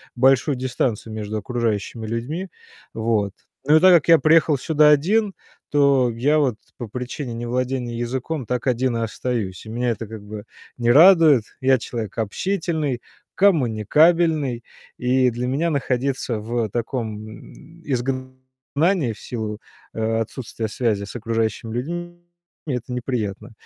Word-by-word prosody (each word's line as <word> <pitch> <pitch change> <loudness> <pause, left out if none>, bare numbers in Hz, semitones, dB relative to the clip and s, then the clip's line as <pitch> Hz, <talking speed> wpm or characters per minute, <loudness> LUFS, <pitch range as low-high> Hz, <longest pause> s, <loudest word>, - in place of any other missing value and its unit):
большую 135 +3 +3
дистанцию 125 -3 -2
между 110 0 -4
окружающими 115 -1 -2
людьми, 130 - -4 0.4
вот. 110 -3 0 0.3
Ну 150 +2 +6
и - - +5
так 185 +2 +7
как 160 - +2
я 165 -1 +8
приехал 155 -1 +4
сюда 150 +2 +4
один, 195 +8 +3 0.4
то 140 -3 +4
я 135 +7 +1
вот 130 -6 +1 0.2
по 120 - -6
причине 125 +3 -5
невладения 120 +1 -2
языком 130 +4 -3
так 125 +3 -3
один 125 0 +1
и - - -2
остаюсь. 110 -4 -3
И - - -9
меня 120 +2 -1
это 115 -1 -3
как 110 0 -9
бы 105 0 -8 0.3
не 120 -1 +2
радует. 160 - +7 0.2
Я 130 0 +4
человек 115 -3 -6
общительный, 155 - -2 0.3
коммуникабельный, 155 - +3 0.3
и 125 +1 +2
для 120 +2 -3
меня 145 +7 0
находиться 130 -4 -1
в 115 +1 -2
таком 110 -2 -5 0.3
изгнании 130 +4 -2
в - - -15
силу 110 -3 -5 0.3
о 115 0 0
отсутствия 115 -1 -5
связи 105 -2 -1
с 100 - -8
окружающими 115 -1 -2
людьми 175 +7 -5 0.4
это 125 -4 -4
неприятно. 115 -3 -3
125 Hz, 135 wpm, -22 LUFS, 115-145 Hz, 0.4 s, я